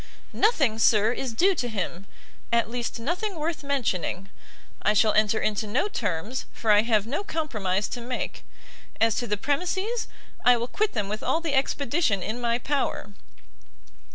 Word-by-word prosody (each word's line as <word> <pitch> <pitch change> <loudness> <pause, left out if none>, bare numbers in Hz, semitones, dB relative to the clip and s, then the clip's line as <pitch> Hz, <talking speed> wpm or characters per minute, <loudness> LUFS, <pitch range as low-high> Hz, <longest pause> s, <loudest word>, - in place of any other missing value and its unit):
"Nothing, 275 - +2
sir, 215 0 +4
is 255 0 -3
due 370 - +3
to 255 -8 -2
him! 195 -3 -4 0.4
at 235 -1 +2
least, 240 -1 -3
nothing 360 - -2
worth 315 0 -3
mentioning. 200 -9 -1 0.5
I 210 - +3
shall 215 +1 +4
enter 215 0 +3
into 215 0 -1
no 255 - +1
terms, 210 - -3
for 220 - +1
I 205 0 +7
have 220 -2 +2
no 280 - -2
compromise 215 - -1
to 245 - -5
make. 245 +1 -4 0.6
As 225 0 +4
to 240 - -1
the 210 - 0
premises, 370 - -1 0.4
I 245 -1 +6
will 235 +1 -2
quit 425 +9 0
them 210 -4 -1
with 210 +2 -4
all 320 - +1
the 330 -4 -3
expedition 270 - +1
in 235 +3 -3
my 235 0 +1
power." 270 -5 -2
235 Hz, 165 wpm, -26 LUFS, 210-290 Hz, 0.6 s, I